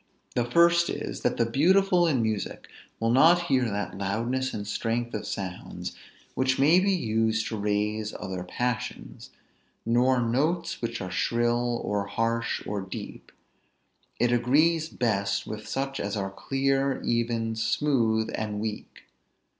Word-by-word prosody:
The 120 - +1
first 170 +6 +4
is; - - -4
that - - 0
the 115 - +3
beautiful 175 +8 +3
in 130 -7 +2
music 110 -2 -3 0.3
will 115 0 +1
not 160 +8 +6
hear 130 -6 +2
that 100 -1 -3
loudness 120 +7 -1
and 105 -1 -5
strength 115 +3 -2
of 105 - -4
sounds, 95 -2 -5 0.4
which 130 0 +1
may 155 +6 +5
be 195 +1 +2
used 110 - +1
to 115 - -3
raise 105 +1 -1
other 95 -1 -4
passions; 100 - -4 0.6
nor 125 +3 +3
notes 150 +9 0
which 115 -1 -3
are 95 -1 -5
shrill, 120 +3 +1
or 100 -1 -1
harsh, 115 +2 -1
or 105 -1 -3
deep; 95 0 -8 0.9
it 120 0 +3
agrees 155 +7 +3
best 100 -5 0
with 110 0 -7
such 135 0 -3
as 100 +1 -2
are 95 -1 -2
clear, 135 +4 0
even, 115 -1 0
smooth, 110 -2 +1
and 105 -1 -3
weak. 110 0 -6
115 Hz, 140 wpm, -27 LUFS, 110-135 Hz, 0.9 s, not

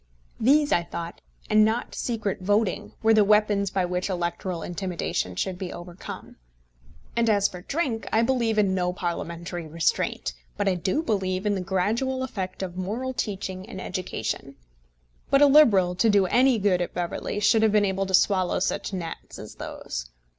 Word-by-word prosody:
These, 290 +5 +4
I 175 - +4
thought, 170 0 -7 0.3
and 215 0 +5
not 225 +3 0
secret 215 -5 -2
voting, 205 +2 0
were 225 0 +5
the 215 -1 +6
weapons 205 -1 +3
by 190 -1 0
which 180 +2 -2
electoral 175 -1 -3
intimidation 175 - -3
should 180 - -2
be 185 -2 -4
overcome. 175 +1 -9 0.8
And 235 -1 +2
as 200 -2 +4
for 180 - -9
drink, 265 - -2
I 225 - +3
believe 235 -3 +1
in 200 -3 +3
no 180 -1 0
Parliamentary 170 -1 -4
restraint; 155 - -1 0.2
but - - 0
I 195 - +4
do 185 - -1
believe 190 - -1
in 210 - +2
the 190 - -2
gradual 220 +8 0
effect 190 -7 -4
of 180 -1 -6
moral 225 +8 -3
teaching 190 -3 -4
and 190 - -7
education. 140 - -4 0.7
But 275 +1 +5
a - - +9
Liberal, 225 -12 +6
to 220 +5 +2
do 200 -2 +4
any 250 +5 +4
good 195 -3 +2
at 175 - -4
Beverley, 175 +3 -3
should 215 +2 +4
have 220 -1 +4
been 210 -1 +4
able 195 0 -1
to 190 - -5
swallow 185 -2 +2
such 200 +2 -2
gnats 170 -3 -6
as - - -9
those. - - -6
195 Hz, 175 wpm, -25 LUFS, 180-220 Hz, 0.8 s, a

